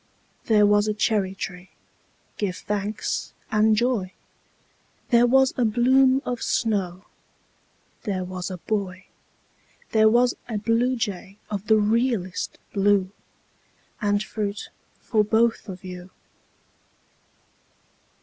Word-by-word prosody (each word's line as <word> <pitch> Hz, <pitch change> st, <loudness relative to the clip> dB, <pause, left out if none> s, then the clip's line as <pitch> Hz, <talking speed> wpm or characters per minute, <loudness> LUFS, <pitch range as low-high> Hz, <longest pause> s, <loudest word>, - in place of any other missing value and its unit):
There 210 Hz, -2 st, +5 dB
was 205 Hz, +1 st, +3 dB
a 215 Hz, -, 0 dB
cherry 205 Hz, -3 st, 0 dB
tree, 180 Hz, -1 st, -7 dB, 0.7 s
give 195 Hz, -4 st, -1 dB
thanks 210 Hz, +2 st, -3 dB, 0.2 s
and 215 Hz, 0 st, +4 dB
joy! 215 Hz, -5 st, 0 dB, 1.0 s
There 240 Hz, -1 st, +5 dB
was 265 Hz, +1 st, +4 dB
a 250 Hz, -, +2 dB
bloom 260 Hz, +4 st, +4 dB
of 245 Hz, -1 st, -3 dB
snow 195 Hz, -5 st, -1 dB, 1.0 s
There 195 Hz, -4 st, -2 dB
was 180 Hz, 0 st, -5 dB
a 185 Hz, -, -5 dB
boy 185 Hz, -1 st, -3 dB, 0.9 s
There 220 Hz, -1 st, +5 dB
was 245 Hz, +2 st, +3 dB, 0.2 s
a 220 Hz, -, -2 dB
bluejay 230 Hz, -4 st, -1 dB
of 205 Hz, 0 st, -4 dB
the 220 Hz, -, +5 dB
realest 215 Hz, -3 st, 0 dB, 0.2 s
blue 195 Hz, -2 st, +2 dB, 0.9 s
And 205 Hz, 0 st, +1 dB
fruit 210 Hz, -2 st, -4 dB, 0.3 s
for 215 Hz, -3 st, +1 dB
both 225 Hz, +1 st, +1 dB
of 185 Hz, 0 st, -8 dB
you. 180 Hz, 0 st, -8 dB
210 Hz, 110 wpm, -24 LUFS, 190-230 Hz, 1.0 s, There